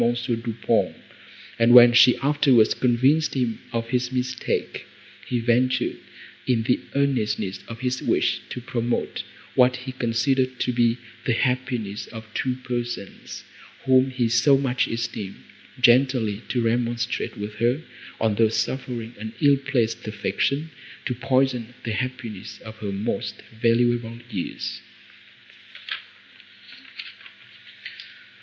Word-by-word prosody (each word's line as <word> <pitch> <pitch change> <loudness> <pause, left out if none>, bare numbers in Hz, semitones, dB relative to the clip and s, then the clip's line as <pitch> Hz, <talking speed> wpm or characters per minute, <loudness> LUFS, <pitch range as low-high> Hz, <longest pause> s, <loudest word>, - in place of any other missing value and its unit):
Du 120 -1 0
Pont; - - +2 0.6
and, 115 +1 +6
when 120 -1 +10
she 120 +1 +7
afterwards 140 -6 +4
convinced 130 +6 +2
him 120 -4 -1
of 115 0 -3
his 125 0 0
mistake, 130 0 -2 0.4
he 125 - 0
ventured, 120 +2 +1 0.5
in 120 -3 +2
the 125 +2 +2 0.2
earnestness 105 -8 0
of 115 +1 -8
his 130 0 -1
wish - - +1
to - - -5
promote 120 -1 -2 0.3
what 125 0 +4
he 130 +1 -6
considered 130 +1 0
to 125 - 0
be 120 0 +2 0.3
the 125 - +2
happiness 125 -5 -1
of 110 -1 -9
two 130 -1 -1
persons, 120 -5 -5 0.4
whom 130 0 +5
he 125 -2 0
so 120 +5 +4
much 130 -2 0
esteemed, 115 -4 -5 0.4
gently 120 -4 +3
to 120 -2 0
remonstrate 120 +1 -1
with 105 0 -6
her, 120 +7 +1 0.4
on 110 -1 +2
thus 110 +1 +2
suffering 120 0 -3
an 110 +1 -6
ill 140 -1 +5
placed 120 -5 -1
affection 140 +8 -1 0.3
to - - -1
poison 130 -2 0
the 115 - -2
happiness 115 -4 -5
of 110 0 -10
her 105 -2 -4
most 100 +2 -3 0.2
valuable 120 0 +2
years. 90 - -4
120 Hz, 120 wpm, -24 LUFS, 115-130 Hz, 0.6 s, when